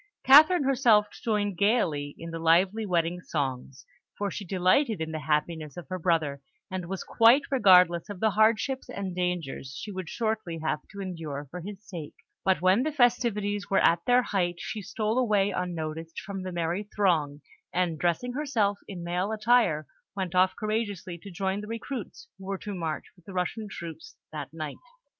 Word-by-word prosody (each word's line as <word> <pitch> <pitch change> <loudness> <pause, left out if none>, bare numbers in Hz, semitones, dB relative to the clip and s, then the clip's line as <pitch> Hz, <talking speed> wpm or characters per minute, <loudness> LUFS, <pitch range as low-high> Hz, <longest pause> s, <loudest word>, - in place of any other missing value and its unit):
Catherine 310 +5 +8
herself 240 -6 +4
joined 205 -4 0
gaily 165 -10 +1
in 165 0 -7
the 165 - -5
lively 185 +7 +3
wedding 175 0 0
songs, 135 -4 -4 0.3
for 205 -1 -2
she 205 - -5
delighted 190 - +2
in 160 0 -3
the 155 - -3
happiness 155 +1 -1
of 175 -5 -8
her 185 - -3
brother, 160 -5 0 0.3
and 185 -2 -4
was 195 -1 -4
quite 235 +5 +5
regardless 180 -8 +5
of 205 -3 -6
the 220 +1 +2
hardships 220 +5 +2
and 190 -3 -5
dangers 175 -7 -3
she 205 - -6
would 185 -4 -6
shortly 220 -7 -2
have 155 -1 -1
to 200 - -8
endure 160 -6 -5
for 180 - -6
his 200 +3 -9
sake; 165 -6 -7 0.3
but 190 -2 +2
when 185 +5 +4
the 310 +4 0
festivities 230 -6 +1
were 195 - +2
at 170 0 +4
their 250 0 +5
height 180 -5 0
she 215 - -5
stole 215 +4 -1
away 205 -5 +2
unnoticed 165 -3 -4
from 195 -1 -6
the 185 0 -5
merry 170 +2 -1
throng, 155 -8 +1 0.3
and, 175 -3 0
dressing 175 +9 0
herself 230 -8 0
in 180 -4 -7
male 180 +4 -1
attire, 220 -8 +3 0.3
went 190 -3 -3
off 185 +1 +3
courageously 205 -5 -3
to 200 - -10
join 190 +2 -2
the 210 - -8
recruits 250 - -6
who 190 - -10
were 195 0 -3
to 205 +2 -6
march 165 -4 -3
with 180 -3 -24
the 195 - -9
Russian 185 +4 -2
troops 190 - -8 0.2
that - - -6
night. - - -6
190 Hz, 180 wpm, -28 LUFS, 170-215 Hz, 0.3 s, Catherine